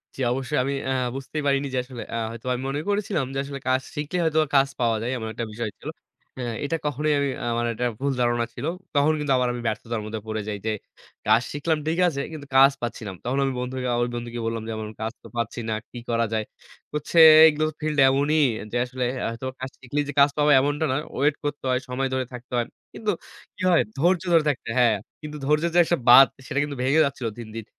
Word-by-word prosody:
জি, - - -14
অবশ্যই। 135 +3 -2
আমি 140 +1 -1 0.2
আ - - +1 0.2
বুঝতেই 135 +3 -4
পারিনি 140 0 +2
যে - - 0
আসলে 125 -2 -8
আ - - -1
হয়তো 115 +1 -10
আমি 125 - -3
মনে 145 +2 -2
করেছিলাম 200 - 0
যে, - - -4
আসলে 140 0 -6
কাজ 130 0 +2
শিখলেই 150 +4 -2
হয়তো 160 -1 +2 0.2
কাজ 135 0 +5
পাওয়া 115 -2 +2
যায়। 120 +2 -2
এমন 110 -1 -5
একটা 115 +1 -3
বিষয় 110 0 -3
ছিল। - - -7 0.5
হ্যাঁ 120 -2 -3
এটা 165 +3 -1
কখনোই 150 +1 0
আমি, 140 -1 +1 0.2
আমার 120 0 0
একটা 125 +2 -2
ভুল 140 0 0
ধারণা 120 -1 +2
ছিল। 130 +4 -6 0.3
তখন 145 +2 +4
কিন্তু 145 -2 +1
আবার 125 - +1
আমি 120 - -5
ব্যর্থতার 115 0 -3
মধ্যে 110 0 -4
পড়ে 110 0 -2
যাই। 105 -1 -3
যে 110 - +1 0.5
কাজ 110 +2 +5
শিখলাম 155 +2 0
ঠিক 165 - 0
আছে, 140 -4 -1
কিন্তু 145 -3 -8
কাজ 135 +1 +8
পাচ্ছি 120 -1 -4
না। - - -4
তখন 130 +3 -1
আমি 135 - -1
বন্ধু 125 +1 -4 0.4
বন্ধুকে 120 0 -5
বললাম 115 0 -2
যে, - - -3
"আমার 110 -1 -5
তো - - -18
কাজ 110 +1 -3 0.2
পাচ্ছি 115 +1 -2
না। - - 0 0.2
কি - - -9
করা 115 0 +2
যায়?" 110 -1 0 0.5
বলছে, 150 +3 -3 0.3
"এগুলো 155 0 +2 0.2
ফিল্ড 155 -1 -1
এমনই 145 +3 +2 0.3
যে 120 - -1
আসলে 125 0 -3 0.2
আ - - 0
তো - - -4 0.3
শিখলেই 145 +3 -2
যে - - -3
কাজ 140 +1 +7
পাওয়া, 150 0 +4
এমনটা 145 +3 0
না। - - +1 0.2
ওয়েট 145 +2 +2
করতে 145 -1 -3
হয়, 125 -1 +2
সময় 135 +1 -1
ধরে 130 -1 0
থাকতে 125 +1 -10
হয়।" 120 - 0 0.3
কিন্তু 215 -2 -1 0.4
কি - - -11
হয়, 170 - +5
ধৈর্য 175 +3 +2
ধরে 165 -2 +6
থাকতে 135 - -3
হয় 115 - -3
হ্যাঁ, 115 -4 +4 0.2
কিন্তু 150 0 -7
ধৈর্যের 150 +3 +2
যে 175 - +6
একটা 175 - +1
বাঁধ, 135 +2 +10 0.2
সেটা 140 - -1
কিন্তু 145 -1 -4
ভেঙে 145 +5 +4
যাচ্ছিল 135 -4 -3
দিন, 115 - -7
দিন। 115 -2 -5
135 Hz, 225 wpm, -24 LUFS, 120-150 Hz, 0.5 s, বাঁধ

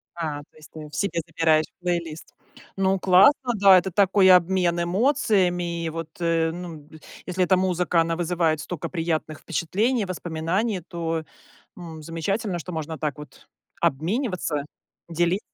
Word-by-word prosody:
А, 155 -4 -3
то 145 - -17
есть 155 - -16
ты 155 -1 -9
себе 170 +2 -1
забираешь 155 -1 +2
плейлист. 170 -3 -4 0.4
Ну, 195 0 +1
классно, 240 +8 +5
да, 195 -2 +7
это 185 +1 0
такой 190 0 +4
обмен 180 -1 +4
эмоциями, 180 - +1
вот, 165 0 -6
э, 165 -1 +1
ну 165 -4 -9 0.4
если 185 0 0
эта 185 - +4
музыка, 180 -2 +1
она 165 0 -1
вызывает 170 -3 0
столько 170 +1 -5
приятных 160 -3 -2
впечатлений, 210 +6 -1
воспоминаний, 180 +4 -2
то, 165 -2 -3 0.5
м, 165 -3 -9
замечательно, 175 +4 -2
что 180 - -7
можно 160 0 -4
так 150 -2 -2
вот 150 - -13 0.3
обмениваться, 165 - -1 0.4
дели 175 +3 +1
175 Hz, 135 wpm, -24 LUFS, 160-190 Hz, 0.5 s, да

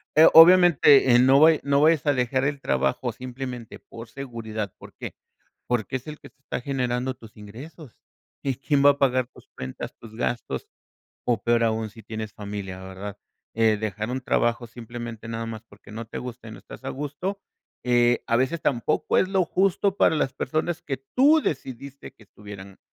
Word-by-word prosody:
Eh, 155 - +8
obviamente, 165 -6 +7
eh, - - +6
no 135 +2 +6
vaya 160 0 +6
no 140 0 +2
vayas 155 -2 +4
a 145 - +3
dejar 130 +1 0
el 145 -1 -2
trabajo 70 - 0
simplemente 125 -1 -7
por 115 0 -12
seguridad, 110 -6 -6
¿por - - -14
qué?, - - -8 0.5
porque 120 +1 -1
es 130 - -15
el 150 0 -8
que - - -13
te 140 - -45
está 130 - -5
generando 125 -1 -2
tus 110 -3 -16
ingresos. 125 +7 -11 0.5
Y, 135 -2 -1
¿quién 140 +2 0
va 145 - +8
a 140 - -6
pagar 130 -3 +2
tus - - -19
cuentas, 65 0 -7
tus 110 -1 -13
gastos?, 120 0 -3 0.6
o 115 -4 0
peor 120 0 +2
aún 110 -1 -1
si 115 +1 -14
tienes 110 -1 -6
familia, 100 -2 -6
¿verdad? 95 +2 -8 0.4
Eh, 110 -1 +3
dejar 105 +1 -4
un 130 +1 -2
trabajo 120 -1 0
simplemente 115 -1 -8
nada 115 0 -4
más, 110 -1 -7
porque 100 +1 -16
no 115 +1 -6
te - - -9
gusta 125 -2 -8
y - - -9
no - - -10
estás - - -13
a - - -3
gusto. 150 +8 -4 0.4
Eh, 120 -1 +3
a 115 - +2
veces 130 +7 0
tampoco 130 +3 +1
es 185 - +2
lo 190 -1 +2
justo 195 +2 +1
para - - +4
las 135 -3 0
personas 160 +3 -2
que 135 - -3 0.2
tú 295 +5 +6
decidiste 135 0 -5
que - - -21
estuvieran 100 -1 -12
125 Hz, 190 wpm, -24 LUFS, 110-140 Hz, 0.6 s, Eh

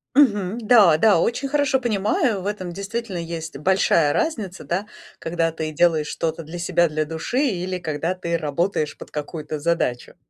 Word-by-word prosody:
Мгм, 210 -7 +3
да, 210 -8 +6
да, 205 +1 +5
очень 250 +4 0
хорошо 285 -1 +2
понимаю. 215 -2 0
В - - -9
этом 185 -4 -4
действительно 200 +1 -4
есть 165 -2 -5
большая 165 -2 +3
разница, 215 - -2
да, 185 +4 -1 0.3
когда 165 0 -1
ты 155 -1 -4
делаешь 160 -1 +2
что-то 160 +1 -3
для 170 +3 -8
себя, 170 0 +2
для 155 0 -1
души 160 - -3
или 185 -4 -2
когда 160 +1 -2
ты 170 -2 -2
работаешь 155 +1 -1
под - - -11
какую-то 150 0 -5
задачу. 145 -6 -1
175 Hz, 165 wpm, -22 LUFS, 160-205 Hz, 0.3 s, да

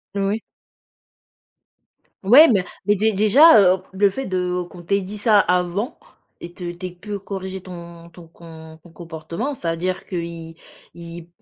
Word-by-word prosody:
Oui. 200 +2 -1 1.8
Ouais, 260 +12 +8
mais 200 -6 +2 0.2
mais 205 +1 +3
dé 215 +3 +1
déjà, 215 +7 +6 0.2
heu, 185 - -12
le 195 +1 +2
fait 265 +7 -5
de 180 -2 -2
qu'on 175 - -12
t'ait 200 +4 0
dit 195 +3 -7
ça 210 0 +4
avant 180 - -1 0.4
et 175 0 -10
te 175 -1 -6
t'aies 180 +1 -7
peu 205 +3 -7
corriger 190 -1 -6
ton 170 -2 -11
ton 170 -1 -14
com 160 -1 -14
ton 175 - -17
comportement, 170 - -6
c'est-à-dire 175 0 -3
qu'ils 170 -2 -6 0.4
ils 170 0 -10
185 Hz, 145 wpm, -21 LUFS, 170-205 Hz, 1.8 s, Ouais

